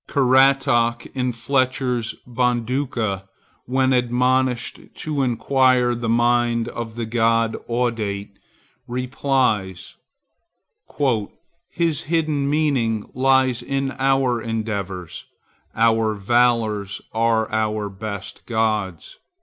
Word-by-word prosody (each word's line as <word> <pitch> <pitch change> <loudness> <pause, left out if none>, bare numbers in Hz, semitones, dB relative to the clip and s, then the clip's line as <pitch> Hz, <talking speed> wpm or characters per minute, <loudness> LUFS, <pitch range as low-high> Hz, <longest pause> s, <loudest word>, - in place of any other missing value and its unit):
Caratach, 130 -3 +3
in 125 -1 -1
Fletcher's 125 -1 -1
Bonduca, 120 -4 -1 0.4
when 130 +1 +2
admonished 125 0 +1 0.2
to 150 -3 -2
inquire 130 0 +2
the 120 -1 -3
mind 120 0 +2
of 115 -2 -6
the 120 -1 -3
god 115 0 +1
Audate, 110 -4 -2 0.6
replies,— 125 -7 -1 1.7
"His 165 -4 0
hidden 155 -3 0
meaning 135 -8 0
lies 130 -1 +2
in 135 -1 -2
our 135 -3 +2
endeavors; 100 -6 -4 0.5
Our 110 -1 +2
valors 110 -2 +1
are 115 0 +2
our 110 -1 0
best 100 -1 -7
gods." 110 -6 -2
120 Hz, 85 wpm, -21 LUFS, 110-130 Hz, 1.7 s, Caratach